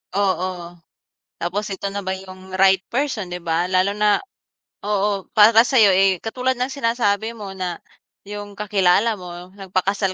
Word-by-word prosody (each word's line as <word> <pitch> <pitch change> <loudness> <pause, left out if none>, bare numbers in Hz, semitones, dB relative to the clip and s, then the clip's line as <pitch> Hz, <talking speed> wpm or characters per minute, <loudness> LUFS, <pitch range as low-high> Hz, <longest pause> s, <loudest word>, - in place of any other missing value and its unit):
Oo. 185 -3 -1 0.6
Tapos 190 +5 -2
ito 200 +1 -4
na 200 0 -4
ba 190 - -2
yung 190 0 -12
right 190 0 +4
person, 250 -6 -1
'di 180 - -4
ba? 165 +1 0
Lalo 185 +2 +2
na 210 -1 +3 0.7
oo, 205 -1 0
para 220 +1 +7
sa'yo, 225 -7 +5
eh, 190 0 +3
katulad 255 +3 -1
ng 255 +2 -2
sinasabi 230 -4 0
mo 200 -2 -7
na 180 -2 -4 0.5
yung 205 0 -7
kakilala 205 +1 +2
mo 180 0 -9
nagpakasal 195 0 -1
195 Hz, 150 wpm, -21 LUFS, 185-210 Hz, 0.7 s, para